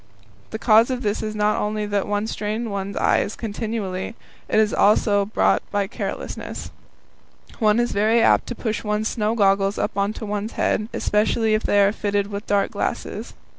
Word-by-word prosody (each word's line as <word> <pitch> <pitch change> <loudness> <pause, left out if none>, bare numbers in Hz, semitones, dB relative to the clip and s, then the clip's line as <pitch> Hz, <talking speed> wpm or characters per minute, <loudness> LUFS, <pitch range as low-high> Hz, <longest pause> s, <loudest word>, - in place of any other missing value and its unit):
The 220 - -4
cause 225 +1 +5
of 255 -1 -2
this 205 0 -1
is 215 0 -4
not 210 0 +1
only 210 0 -1
that 205 -1 -1
one 205 +1 -1
strains 220 +1 -3
one's 200 -1 -4
eyes 205 - +1
continually; 215 -2 -4 0.3
it - - +3
is 215 -1 +2
also 205 -1 +3
brought 210 - +2
about - - -34
by 205 -1 +1
carelessness. - - -6 0.9
One 215 -1 +3
is 240 0 +1
very 215 +3 +3
apt 230 - +4
to 245 - -4
push 220 -1 -3
one's 210 +1 -1
snow 215 -1 -1
goggles 195 -1 +2
up - - -2
on 200 +1 0
to 220 - -7
one's 210 +1 -3
forehead, 215 +1 0
especially 220 +1 +1
if 215 - +2
they 205 - +2
are 200 - +3
fitted 205 -1 -1
with 200 +1 -5
dark 200 -1 +1
glasses. - - -4
210 Hz, 185 wpm, -22 LUFS, 205-220 Hz, 0.9 s, cause